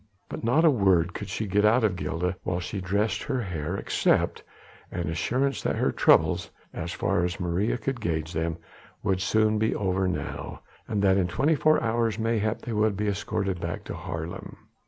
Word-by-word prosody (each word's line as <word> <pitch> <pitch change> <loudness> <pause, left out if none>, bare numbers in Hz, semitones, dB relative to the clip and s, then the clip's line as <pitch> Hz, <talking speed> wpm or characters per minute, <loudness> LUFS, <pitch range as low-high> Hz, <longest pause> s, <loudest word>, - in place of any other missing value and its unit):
But - - -6
not 135 +9 +3
a - - +8
word 95 - +3
could 100 - -6
she 110 +4 -2
get 105 +1 +2
out 115 +3 +4
of 105 -4 +2
Gilda 90 0 -2
while 90 -1 -2
she 95 +2 -4
dressed 100 +3 0
her 135 -3 -2
hair, 90 -4 -3
except - - +1 0.5
an 85 -2 -3
assurance 125 +11 0
that - - 0
their - - +1
troubles - - +3 0.2
as 85 +1 -4
far 95 -1 0
as 90 -1 -2
Maria 90 +7 0
could 125 +1 -3
gauge 80 -4 -2
them 80 +1 -1 0.5
would 95 -2 +1
soon 110 +2 +2
be 110 +1 +1
over 95 -1 0
now, 90 - -4 0.2
and 105 -2 -1
that 95 -1 +4
in 90 -2 +2
twenty 135 - +2
four 155 +1 +4
hours 115 -2 +1
mayhap 110 -1 0
they 120 - -4
would 105 -2 +1
be 105 0 0
escorted 100 -2 -2
back 85 0 -4
to - - -6
Haarlem. 80 +1 -6
100 Hz, 190 wpm, -27 LUFS, 90-110 Hz, 0.5 s, a